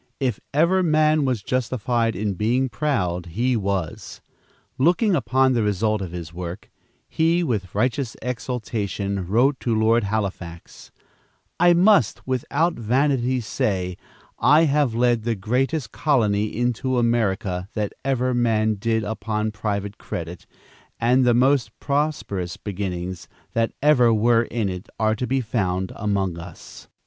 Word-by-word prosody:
If 125 -6 -1
ever 170 +6 +3
man 155 -3 +3
was 125 -6 -1
justified 120 -2 0
in 100 +1 -1
being 120 +7 0
proud, 90 - -1
he 120 +9 0
was. 100 -6 -3 0.6
Looking 180 - +3
upon 130 -2 +2
the 120 - +1
result 105 +1 0
of 95 -3 -5
his 85 -2 -7
work, 90 +2 -7 0.4
he, 165 +2 +1
with 105 - -3
righteous 120 +3 0
exultation, 110 -6 -3
wrote 125 +7 +2
to 115 -3 0
Lord 115 0 +3
Halifax, 95 -5 -5 0.7
"I 175 0 +6
must, 180 - +3
without 130 +6 0
vanity, 130 +1 +1
say 95 -4 -2 0.4
I 155 +2 +5
have 145 -6 +2
led 120 -1 +2
the 115 +1 -1
greatest 125 +5 -1
colony 110 -8 +1
into 120 +3 -1
America 100 -6 0
that 105 -2 -2
ever 130 -2 0
man 110 -3 +1
did 110 +1 0
upon 110 0 -2
private 100 -1 -4
credit, 85 0 -6 0.5
and 125 +3 +3
the 120 -1 +4
most 130 +1 +2
prosperous 140 - -2
beginnings 90 -4 -5 0.3
that 115 0 +1
ever 130 -6 +5
were 115 +1 +3
in 115 -3 -2
it 90 +2 -6
are 110 0 +2
to 125 +3 -3
be 135 0 +1
found 95 -5 -1
among 95 -4 -1
us." 85 0 -11
115 Hz, 135 wpm, -23 LUFS, 100-130 Hz, 0.7 s, I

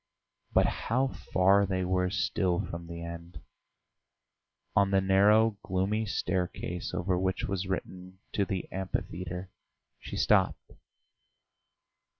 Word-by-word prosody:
But - - +4
how 130 +4 0
far 100 -2 +3
they 95 -1 -1
were 90 0 +1
still 95 -2 0
from 85 0 -7
the 85 0 -7
end! 85 +1 -8 1.4
On 100 -1 +4
the 95 0 +4
narrow, 100 +3 +4
gloomy 100 +4 0
staircase 90 -2 -2
over 90 0 0
which 95 0 -1
was 95 -1 -2
written 95 0 -5 0.2
"To 100 - +2
the 95 -1 -3
Amphitheatre," 90 -1 -4 0.5
she - - -7
stopped. - - +2
95 Hz, 115 wpm, -30 LUFS, 90-100 Hz, 1.4 s, But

